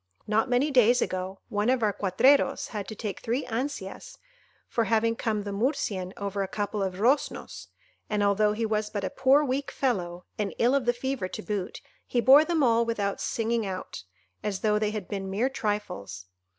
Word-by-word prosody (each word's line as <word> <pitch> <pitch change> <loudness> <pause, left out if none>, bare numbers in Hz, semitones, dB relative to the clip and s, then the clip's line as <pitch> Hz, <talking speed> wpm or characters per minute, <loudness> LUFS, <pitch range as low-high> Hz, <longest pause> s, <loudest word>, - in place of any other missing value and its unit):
Not 220 +4 +1
many 255 +4 +2
days 245 -2 +5
ago, 185 -1 -3
one 210 +2 0
of 255 -2 +2
our 210 -2 +2
cuatreros 210 +10 +3
had 205 -4 -5
to 220 - -6
take 210 -2 -5
three 240 +5 -2
ansias 235 -4 -5 0.5
for 230 - 0
having 230 0 +2
come 220 -3 -1
the 200 - -5
Murcian 200 -4 -1
over 200 0 -3
a 195 - -1
couple 205 +1 -3
of 190 -2 -1
roznos, 250 +9 0 0.4
and 210 -1 +1
although 210 +1 +3
he 225 +2 -1
was 215 -1 -1
but 205 -2 -4
a - - -2
poor 270 +3 +4
weak 275 0 -1
fellow, 180 -9 -2
and 205 -2 -2
ill 240 +3 +3
of 275 -3 +1
the 240 - +3
fever 260 -5 -3
to 215 - -7
boot, 200 -3 -4 0.3
he 245 - 0
bore 270 +5 +8
them 325 -2 +1
all 230 -2 +4
without 210 -4 -2
singing 230 0 0
out, 190 -2 -5 0.4
as 195 -2 -3
though 210 -1 +2
they 210 -1 +1
had 210 -4 -5
been 195 -1 -4
mere 215 +7 +1
trifles. 205 - -4
215 Hz, 190 wpm, -27 LUFS, 200-245 Hz, 0.5 s, bore